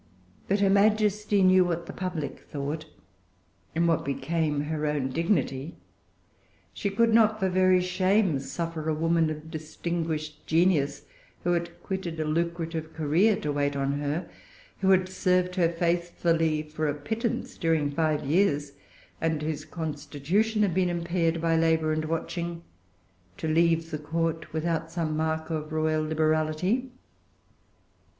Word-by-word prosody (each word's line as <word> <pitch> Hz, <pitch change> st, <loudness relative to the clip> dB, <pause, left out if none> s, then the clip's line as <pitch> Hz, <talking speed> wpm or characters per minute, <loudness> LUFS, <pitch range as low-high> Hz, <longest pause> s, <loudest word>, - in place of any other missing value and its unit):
But 200 Hz, +1 st, +1 dB
her 200 Hz, -, +4 dB
Majesty 210 Hz, 0 st, +3 dB
knew 185 Hz, 0 st, +6 dB
what 170 Hz, -1 st, -2 dB
the -, -, -8 dB
public 175 Hz, -6 st, -4 dB
thought, 150 Hz, +2 st, -5 dB, 0.9 s
and 170 Hz, +1 st, +2 dB
what 165 Hz, -3 st, +2 dB
became 150 Hz, +1 st, -1 dB
her 150 Hz, 0 st, -2 dB
own 145 Hz, -3 st, 0 dB
dignity. 150 Hz, -2 st, -1 dB, 1.0 s
She 200 Hz, -, -2 dB
could 225 Hz, +3 st, +2 dB
not 220 Hz, -1 st, +4 dB
for 190 Hz, -2 st, +1 dB
very 185 Hz, 0 st, +4 dB
shame 185 Hz, -2 st, +2 dB
suffer 160 Hz, +3 st, -4 dB
a 155 Hz, -, +1 dB
woman 165 Hz, 0 st, +2 dB
of 155 Hz, +1 st, -7 dB
distinguished 155 Hz, -1 st, -4 dB
genius, 165 Hz, -3 st, +2 dB, 0.4 s
who 175 Hz, -, +1 dB
had 170 Hz, 0 st, -3 dB
quitted 180 Hz, -4 st, -4 dB
a 155 Hz, -, 0 dB
lucrative 165 Hz, 0 st, -2 dB
career 165 Hz, +8 st, +3 dB
to 150 Hz, -, -1 dB
wait 145 Hz, 0 st, 0 dB
on 140 Hz, +1 st, -1 dB
her, 145 Hz, +4 st, -2 dB, 0.5 s
who 190 Hz, -, +2 dB
had 185 Hz, -1 st, +4 dB
served 180 Hz, -1 st, +1 dB
her 175 Hz, -3 st, +2 dB
faithfully 170 Hz, -2 st, +1 dB
for 155 Hz, 0 st, -3 dB
a 145 Hz, -, 0 dB
pittance 220 Hz, -, -3 dB
during 160 Hz, -3 st, +1 dB
five 155 Hz, -1 st, 0 dB
years, 145 Hz, -2 st, +2 dB, 0.5 s
and 160 Hz, -2 st, 0 dB
whose 155 Hz, -1 st, -3 dB
constitution 160 Hz, +8 st, -1 dB
had 195 Hz, -4 st, +1 dB
been 185 Hz, 0 st, +2 dB
impaired 170 Hz, -1 st, 0 dB
by 165 Hz, 0 st, +2 dB
labor 160 Hz, -1 st, +2 dB
and 155 Hz, 0 st, -1 dB
watching, 170 Hz, +1 st, -3 dB, 0.7 s
to -, -, -3 dB
leave 165 Hz, +1 st, +2 dB
the 150 Hz, -, -3 dB
Court 160 Hz, +1 st, -2 dB
without 165 Hz, 0 st, -1 dB
some 165 Hz, -2 st, -2 dB
mark 160 Hz, +1 st, -1 dB
of 155 Hz, -1 st, -3 dB
royal 155 Hz, 0 st, +1 dB
liberality. 155 Hz, +9 st, +1 dB
165 Hz, 145 wpm, -27 LUFS, 155-180 Hz, 1.0 s, knew